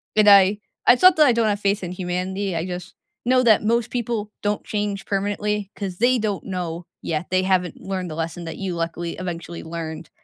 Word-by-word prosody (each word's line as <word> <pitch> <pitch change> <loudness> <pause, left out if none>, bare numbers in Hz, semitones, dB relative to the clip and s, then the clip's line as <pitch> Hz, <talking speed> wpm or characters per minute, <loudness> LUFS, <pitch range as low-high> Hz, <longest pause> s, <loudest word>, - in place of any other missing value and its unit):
And 215 -1 +6
I 200 0 +7 0.3
I - - +8
thought 365 +6 +6
that 305 -2 +7
I 250 - +5
don't 230 -1 +2
have 205 -1 0
faith 200 0 0
in 180 - -4
humanity; 185 +1 -3
I 165 +1 -1
just 180 0 -7 0.3
know 255 +1 +4
that 225 -3 +5
most 230 +1 +1
people 230 -3 -2
don't 205 0 -1
change 205 -2 -2
permanently 205 0 -1
'cause 190 -3 -5
they 245 +4 +3
don't 210 -4 -2
know 175 -2 -4 0.2
yet, 160 +1 -2
they 185 0 +2
haven't 185 -3 0
learned 185 -2 -4
the 155 - -6
lesson 165 +1 -4
that 165 - -6
you 190 -2 -3
luckily 170 0 -3
eventually 170 -1 -6
learned 160 0 -6
195 Hz, 205 wpm, -23 LUFS, 175-210 Hz, 0.3 s, I